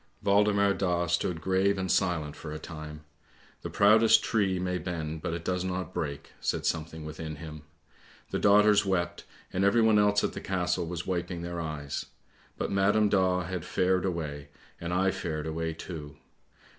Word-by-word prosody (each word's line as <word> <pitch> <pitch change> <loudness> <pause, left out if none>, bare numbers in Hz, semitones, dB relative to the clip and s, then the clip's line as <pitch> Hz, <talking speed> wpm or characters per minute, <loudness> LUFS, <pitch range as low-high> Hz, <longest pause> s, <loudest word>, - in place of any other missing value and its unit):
Waldemar 100 0 +4
Daa 90 -3 0
stood 85 0 -1
grave 95 +3 +2
and 95 -2 -1
silent 85 -6 0
for 80 - -8
a 75 - -4
time; 75 -1 -8 0.3
' - - -29
the - - -5
proudest 110 +2 +5
tree 100 -4 +1
may 90 0 -1
bend, 80 -4 -4
but 85 - -2
it 85 - -7
does 90 0 0
not 95 0 -3
break,' 70 -2 -4
said - - -1
something 80 -1 -2
within 80 0 -6
him. 75 0 -9 0.7
The - - -1
daughters 105 0 +5
wept, 85 -3 -1 0.3
and 95 - +1
everyone 110 +1 +5
else 105 0 +3
at - - 0
the - - -6
Castle 90 -2 -1
was 85 0 -4
wiping 90 -1 -3
their 85 0 -4
eyes; 75 -3 -4 0.5
but - - -2
Madam 105 +2 +3
Daa 95 -2 +2
had 90 -1 -4
fared 95 0 +1
away, 75 -6 -3 0.3
and 85 0 -4
I 95 +2 +2
fared 80 -5 -4
away 80 +1 -2
too! 80 -3 -8
90 Hz, 170 wpm, -29 LUFS, 80-95 Hz, 0.7 s, proudest